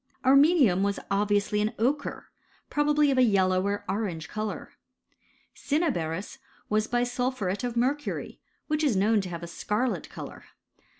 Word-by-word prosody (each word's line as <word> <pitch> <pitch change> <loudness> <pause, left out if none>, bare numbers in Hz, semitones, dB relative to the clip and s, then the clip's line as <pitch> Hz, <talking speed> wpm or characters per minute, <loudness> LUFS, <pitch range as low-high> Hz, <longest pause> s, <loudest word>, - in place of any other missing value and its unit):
ATmenium 275 - +5
was 200 0 0
obviously 205 +1 +1
an 215 +3 0
ochre, 265 +7 -1 0.4
probably 295 0 +3
of 260 - +2
a - - +6
1 240 - +4
yellow 185 -2 +2
or 205 +1 -2
orange 180 -7 -3
colour. 215 0 -5 0.8
I - - -26
Mimaberis 245 - -1 0.3
was 215 +1 +1
bisulphuret 245 -4 -1
of 240 -1 -3
mercury, 275 +5 -1 0.3
which 305 0 -1
is 260 -10 +2
I - - +3
Vrown 215 +1 +3
to 185 - -6
have 170 -1 -6
a - - -5
scarlet 210 +8 -2
colour. - - -9
215 Hz, 155 wpm, -27 LUFS, 200-265 Hz, 0.8 s, a